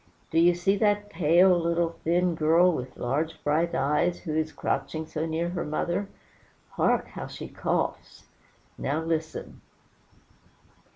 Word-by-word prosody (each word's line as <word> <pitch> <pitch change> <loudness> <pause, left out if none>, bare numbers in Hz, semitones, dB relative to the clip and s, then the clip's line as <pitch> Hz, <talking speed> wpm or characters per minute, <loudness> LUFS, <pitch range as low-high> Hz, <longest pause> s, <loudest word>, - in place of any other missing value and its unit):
Do 165 - +3
you 175 +1 +5
see 195 +3 +1
that 205 -1 +1
pale, 175 +3 +5
little, 170 0 +1
thin 175 +1 +2
girl, 165 +3 +4
with 130 -4 -6
large, 145 +6 -1
bright 160 +3 +1
eyes, 150 +5 +1
who 155 -4 -4
is 155 0 0
crouching 160 0 -2
so 155 +1 -3
near 165 +2 -1
her 175 - -3
mother? 175 +6 -2 0.6
hark! - - +1
how - - -7
she - - -8
coughs. - - -3 0.5
Now 150 +4 -1
listen. 160 -1 -4
165 Hz, 135 wpm, -27 LUFS, 155-175 Hz, 0.6 s, you